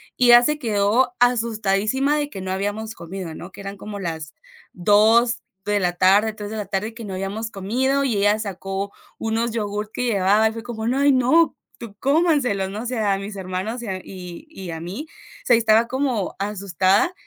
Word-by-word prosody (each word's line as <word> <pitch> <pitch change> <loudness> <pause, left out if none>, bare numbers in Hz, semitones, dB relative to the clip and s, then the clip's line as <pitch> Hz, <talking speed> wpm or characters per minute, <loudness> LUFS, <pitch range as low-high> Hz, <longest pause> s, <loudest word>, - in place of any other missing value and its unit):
y 250 - +3
ella 240 0 +9
se 300 +4 +1
quedó 230 +1 +1
asustadísima 230 +2 +2
de 290 -1 -1
que 195 - -8
no 185 0 -5
habíamos 205 +3 -3
comido, 170 -2 -7
¿no? 175 - -9
Que - - -14
eran 195 0 -6
como 205 0 -7
las 160 -4 -5 0.4
2 220 +5 +4 0.2
de 205 -1 +1
la 175 -1 +2
tarde, 200 +5 +4
3 210 -1 -8
de - - -4
la 210 -2 -3
tarde 205 +4 -3
que 230 0 -9
no 195 -2 -6
habíamos 200 +4 -4
comido, 260 +8 0
y 245 -5 0
ella 205 +2 +3
sacó 195 -1 -4 0.2
unos 225 +1 -1
yogurt 210 -1 -3
que 250 - -2
llevaba, 210 -1 +3
y 220 - -2
fue 225 0 -7
como: 225 -2 -5
"No, 260 +3 +1
ay, 285 0 +5
no, 265 +6 +3 0.2
tú 230 -4 -9
cómanselos, 275 - +2
¿no?" 210 +3 -5
O - - -7
sea, 220 -5 0
a - - 0
mis 200 +1 -7
hermanos 190 +5 -4
y - - -6
a 190 -2 -2
y 180 - -9
y 190 - -8
a 165 - -5
mí, 190 - -6 0.4
se 245 - +6
y - - +4
estaba 225 0 +4
como 260 -7 -1
asustada, 200 - +1
215 Hz, 205 wpm, -22 LUFS, 195-240 Hz, 0.4 s, ella